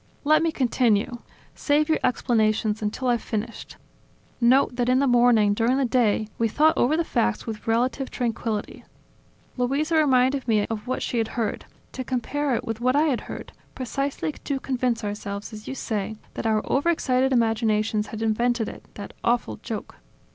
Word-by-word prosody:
"Let 305 +1 +4
me 330 0 +1
continue. 240 -4 +1 0.3
Save 295 +1 +1
your 315 - +2
explanations 220 -3 +1
until 215 +5 -2
I've 240 -2 +2
finished. 225 +2 -5 0.6
Note 250 +1 +4
that 245 0 0
in 255 - +4
the 280 - +3
morning, 240 -5 +4
during 235 +5 +1
the 275 - +2
day, 230 -3 +2
we 230 - +3
thought 310 +8 +3
over 290 +6 +2
the 335 - +2
facts 105 - 0
with 225 0 -7
relative 250 +4 0
tranquility. 225 -3 -3 0.7
Luisa 280 +6 0
reminded 265 -2 +3
me 215 -3 +3
of 225 +1 -5
what 255 - -2
she 240 - -1
had 225 - 0
heard, 225 -3 -2 0.3
to 260 - -5
compare 265 +2 -1
it - - -3
with 225 0 -4
what 255 +2 +2
I 295 - +4
had 255 - 0
heard, - - -8 0.2
precisely 275 +4 -2
to 280 -2 -4
convince 250 -3 -1
ourselves, 205 +1 -5
as 215 0 -9
you 265 - -4
say, 220 -4 -3 0.2
that - - -3
our 215 -1 +1
overexcited 265 -3 +1
imaginations 220 -3 +1
had 220 0 -5
invented 235 +1 +1
it, - - -11
that 205 - -8
awful 240 0 0
joke. 225 -3 -7
240 Hz, 170 wpm, -24 LUFS, 220-265 Hz, 0.7 s, Let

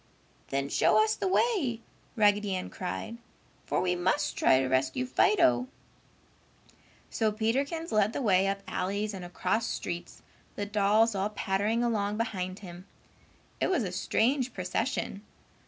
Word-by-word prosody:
"Then 140 0 -1
show 165 +7 +3
us 215 0 +1
the - - -2
way!" 370 - +1 0.4
Raggedy 205 -3 +3
Ann 185 - -5
cried, 220 +5 -5 0.5
"for - - 0
we 180 -1 +1
must 185 +2 0
try 130 - +4
to 135 - 0
rescue 130 - 0
Fido." 325 -2 +3 1.4
So 220 -2 +1
Peterkins 275 +10 -1
led 210 0 +3
the - - -3
way 195 -3 +3
up 195 0 -2
alleys 200 +3 -2
and 190 -2 -7
across 215 +6 -1
streets, 175 0 -5 0.3
the 205 - -3
dolls 210 +2 +3
all 195 +1 -1
pattering 210 +3 0
along 210 -3 0
behind 185 -5 -3
him. 180 0 -10 0.7
It - - +1
was 345 -10 +1
a 185 - -3
strange 245 +7 0
procession. 185 +1 -2
205 Hz, 140 wpm, -29 LUFS, 185-230 Hz, 1.4 s, try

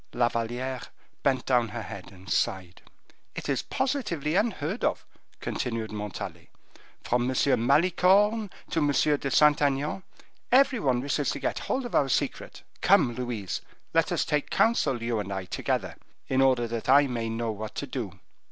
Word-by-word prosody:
La 120 -1 +2
Valliere 120 +3 -3 0.4
bent 135 -2 +1
down 125 -3 +3
her 110 +1 -5
head 95 -1 -9
and 95 0 -15
sighed. 95 -3 -1 0.5
"It - - -5
is 135 - 0
positively 240 - -1
unheard 195 -2 -1
of," - - 0 0.3
continued 115 -3 -3
Montalais; 100 -5 -6 0.5
"from 120 +1 +1
M. 130 - -2 0.3
Malicorne 190 +7 +4 0.2
to 165 - +1
M. 145 - +2 0.3
de 140 - -2
Saint 150 +2 +5
Aignan, 145 +5 0 0.5
every 265 0 +5
one 130 -6 +1
wishes 145 +1 0
to - - -2
get - - -2
hold 260 -1 -2
of 240 - -7
our 135 - +3
secret. - - -2 0.2
Come, 120 - +4
Louise, 120 -5 -4 0.3
let - - +2
us - - +1
take 150 -1 -1
counsel, 140 - +2
you 115 -1 0
and 100 -1 -4
I, 95 -1 -3
together, - - -2 0.3
in 130 0 +2
order 130 -3 +3
that 115 +1 -4
I 140 +2 +7
may 120 -4 -3
know 115 0 -2
what 110 0 -7
to - - -3
do." - - -5
130 Hz, 165 wpm, -27 LUFS, 115-150 Hz, 0.5 s, I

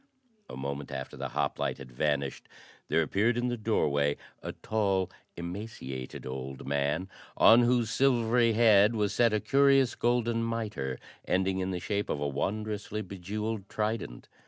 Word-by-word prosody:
A - - -7
moment 70 +1 -4
after 65 -1 -5
the - - -4
hoplite - - -1
had 65 -2 -11
vanished, 70 +1 -1 0.4
there 80 - +2
appeared 110 +9 +1
in 120 0 0
the 120 - -1
doorway 75 -11 +1 0.2
a - - -4
tall, 100 -4 0 0.3
emaciated 85 - -6
old 65 +1 -6
man 70 +6 0 0.3
on 115 +2 +8
whose 120 -2 +2
silvery 120 -3 +3
head 110 -1 +5
was 105 -2 0
set 115 0 +4
a 110 - +1
curious 135 0 +4
golden 120 -1 +1
mitre 105 - -3 0.3
ending 95 +1 +1
in 95 0 -1
the 90 -1 -2
shape 100 +3 -2
of 75 - -1
a 75 - -1
wondrously 105 +8 -3
bejewelled 100 +2 -4
trident. 105 - -3
100 Hz, 150 wpm, -29 LUFS, 75-115 Hz, 0.4 s, on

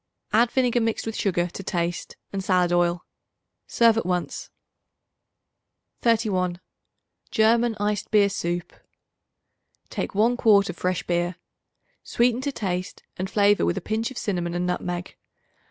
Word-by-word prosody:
Add 230 +2 +4
vinegar 245 -2 +1
mixed 225 -1 -1
with 225 -1 -4
sugar, 175 -3 0
to 185 - -8
taste, 175 -2 -3 0.2
and 195 -1 -2
salad 180 -2 +2
oil. 175 0 +1 0.6
Serve 230 -1 +4
at - - -4
once. 180 -1 -2 1.5
31. 195 -7 +1 0.7
German 230 +1 +3
Iced 210 0 -1
Beer 210 -2 +5
Soup. 175 -3 -3 1.2
Take - - -4
one 230 +4 +3
quart 200 -6 +4
of 180 - -15
fresh 180 0 -1
beer. 175 0 -1 0.7
Sweeten 240 +1 +1
to 285 +1 -2
taste 185 -7 -4
and 185 +1 -3
flavor 205 0 +3
with - - +1
a - - +1
pinch 220 +5 -2
of 260 - -10
cinnamon 175 -5 -2
and 175 0 -1
nutmeg. 180 0 -3
200 Hz, 140 wpm, -24 LUFS, 180-225 Hz, 1.5 s, Beer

